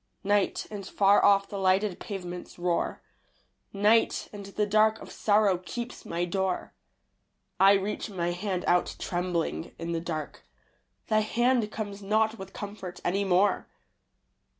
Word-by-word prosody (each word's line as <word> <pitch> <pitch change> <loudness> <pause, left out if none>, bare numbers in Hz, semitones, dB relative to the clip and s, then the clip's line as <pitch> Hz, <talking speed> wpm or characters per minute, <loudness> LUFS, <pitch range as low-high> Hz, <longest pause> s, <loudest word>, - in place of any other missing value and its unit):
Night; 205 0 +1
and 205 -2 -5
far 200 0 +4
off 200 -1 +5
the 200 - -5
lighted 190 0 +2
pavements 180 -3 -7
roar. 175 -1 -1 0.7
Night; 210 +3 +2
and 200 -1 -8
the 210 +1 -1
dark 215 +1 +3
of - - -11
sorrow 205 -3 +3
keeps 235 +6 -7
my 170 +1 -1
door. 190 +1 -2 0.9
I 195 +1 +7
reach 200 +3 -1
my 175 -3 -2
hand 185 0 -3
out 175 0 +2
trembling 175 -2 -2
in 170 0 -4
the 165 -1 -1
dark. 155 -3 -5 0.6
Thy 215 -1 +2
hand 235 +1 +1
comes 205 -2 -5
not 220 +2 +1
with 190 0 -8
comfort 200 -4 -7
any 195 +3 +1
more. 190 +1 +2
195 Hz, 140 wpm, -28 LUFS, 180-210 Hz, 0.9 s, I